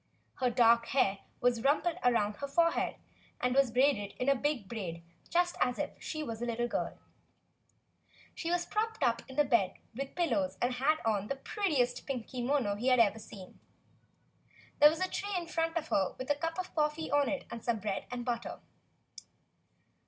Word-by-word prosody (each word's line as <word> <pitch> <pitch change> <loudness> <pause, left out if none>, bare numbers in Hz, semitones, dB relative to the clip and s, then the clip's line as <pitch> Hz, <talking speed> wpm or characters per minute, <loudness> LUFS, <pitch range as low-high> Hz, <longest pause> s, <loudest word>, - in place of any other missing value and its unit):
Her 255 -1 +2
dark 235 -1 +4
hair 200 -7 +2 0.2
was 245 -2 +2
rumpled 300 +5 +2
up - - -13
around 210 -4 +2
her 280 - -4
forehead, 335 +4 +2 0.4
and 250 0 +1
was 275 -1 +4
braided 240 -4 +2
in 250 - -1
a 275 - +5
big 275 -6 -1
braid 180 -7 -5 0.3
just 350 0 +2
as 250 0 +2
if - - -2
she 310 -1 -4
were 230 - -4
a - - -8
httle 240 0 -1
girl. - - -3 1.4
She 335 - -4
was 350 0 +1
propped 445 +1 -2
up 235 -1 +2
in 265 - -9
bed 230 -8 +2 0.2
with 270 +4 -5
pillows 205 - 0
and 245 +1 +1
had 275 +5 +2
on 210 -2 +1
the 275 - -2
prettiest 275 - -1
pink 255 -5 -3
kimono 250 -3 0
he 245 +5 +1
THE 255 - +6
LETTER - - +1
S - - +10
had 210 - +3
ever 225 - -11
seen. 190 -3 -12 1.2
There 295 0 +9
was 320 +3 -4
a - - -4
tray 405 +2 -3
in 345 - -3
front 330 0 -1
of 320 -1 -3
her 190 -2 +1
with 260 +2 -2
a - - +3
cup 330 +2 -3
of 370 0 -4
coffee 300 +1 0
on 285 -1 +3
it 285 - -3
and 230 - -7
some 235 -2 +1
bread 200 -1 -3
and 245 -1 -5
butter. 240 -1 -3
255 Hz, 195 wpm, -32 LUFS, 230-305 Hz, 1.4 s, S